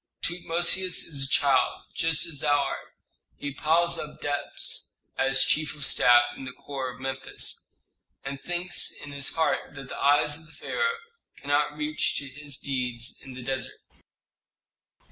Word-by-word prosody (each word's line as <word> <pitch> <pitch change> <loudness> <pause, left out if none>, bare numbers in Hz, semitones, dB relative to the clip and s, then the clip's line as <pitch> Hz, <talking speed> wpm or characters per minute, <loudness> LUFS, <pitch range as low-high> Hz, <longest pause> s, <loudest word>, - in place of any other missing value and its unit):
"Tutmosis 175 +2 +2
is 140 -4 0
a - - -4
child, 135 -2 +3
just 165 0 +3
as 160 -4 -4
thou 145 0 +3
art. 140 -1 -4 0.4
He 145 -1 -4
piles 165 +4 +2
up 150 - -7
debts 145 -1 -2 0.2
as 135 0 +3
chief 150 +1 +1
of 150 -2 -3
staff 120 -1 +6
in - - -8
the 130 -1 -6
corps 130 -3 -5
of - - -16
Memphis, 135 0 -4 0.5
and 135 0 -4
thinks 175 +1 0
in 145 - -8
his 140 -1 0
heart 160 -2 0
that 135 -2 -8
the - - -6
eyes 145 +1 +4
of 160 - -11
the 165 - -16
pharaoh 465 -1 -1 0.4
cannot 145 +1 +1
reach 150 0 0
to 140 - -2
his 140 0 -7
deeds 125 -3 -2
in 130 -2 -9
the 130 - -7
desert." 130 +1 -1
145 Hz, 160 wpm, -27 LUFS, 135-155 Hz, 0.5 s, staff